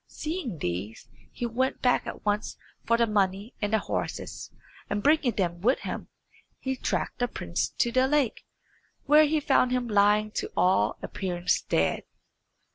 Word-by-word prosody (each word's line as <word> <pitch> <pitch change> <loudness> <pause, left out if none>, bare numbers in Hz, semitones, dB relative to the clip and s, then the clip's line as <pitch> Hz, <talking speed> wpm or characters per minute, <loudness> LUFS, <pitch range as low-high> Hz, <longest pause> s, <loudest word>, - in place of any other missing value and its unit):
Seeing 305 - -4
these, 95 - -4 0.2
he 240 - -4
went 255 +3 -1
back 250 -1 +2
at - - -7
once 210 +1 -1 0.3
for 230 - +4
the 235 - +4
money 200 +1 0
and 205 0 -1
the 220 - +4
horses, 210 - -4 0.4
and 205 0 -2
bringing 290 -4 +3
them 175 -3 -1
with 250 +7 +2
him, - - -5 0.5
he 265 0 -3
tracked 255 - -2
the 245 - +1
prince 85 - -2
to 235 - +2
the 255 +2 +3
lake, 285 -4 +1 0.6
where 300 +1 +7
he 305 +1 +1
found 270 -3 +3
him 250 -1 0
lying 210 0 +3
to - - -3
all 115 - +3
appearance 180 -2 -1
dead. - - 0
225 Hz, 160 wpm, -27 LUFS, 195-260 Hz, 0.6 s, where